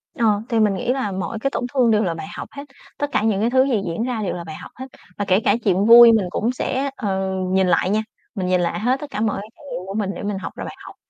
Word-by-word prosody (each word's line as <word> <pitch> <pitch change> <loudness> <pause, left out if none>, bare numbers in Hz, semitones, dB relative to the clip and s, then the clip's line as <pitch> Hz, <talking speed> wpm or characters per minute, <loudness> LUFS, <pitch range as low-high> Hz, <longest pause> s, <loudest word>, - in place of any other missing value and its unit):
Ờ, 215 -3 +2
thì 230 - +1
mình 210 -2 +3
nghĩ 195 +6 -1
là 260 -7 -2
mỗi 195 +4 -4
cái 275 - 0
tổn 250 - -2
thương 250 -4 +3
đều 215 0 +3
là 175 -4 -1
bài 165 +4 -7
học - - -6
hết, 280 - -8 0.3
tất 290 - -1
cả - - +1
những 210 -3 +1
cái 225 - +2
thứ 260 +1 +4
gì 250 -6 0
diễn 170 +6 -2
ra 245 -3 -2
đều 195 - -2
là 175 - -6
bài 155 -2 -8
học - - -11
hết, 260 - -7 0.3
và 205 - -2
kể 190 0 +3
cả - - +4
chuyện 195 -1 +2
vui 235 +1 +9
mình 220 -4 +2
cũng 225 +7 -1
sẽ, 265 +2 -2
ờ, 190 -3 -2 0.2
nhìn 190 0 +3
lại 180 +1 +2
nha, 215 +2 +1 0.3
mình 190 -3 -2
nhìn 180 -1 +2
lại 170 - -1
hết 250 +5 +1
tất 295 - -7
cả 210 - -3
mọi 215 -3 0
cái 210 - -11
trải - - -19
nghiệm 185 -7 -5
của 195 - -5
mình 205 -2 -1
để - - -7
mình 205 -1 -2
học 190 - -6
ra - - -6
bài - - -8
học. - - -11
210 Hz, 310 wpm, -21 LUFS, 190-240 Hz, 0.3 s, vui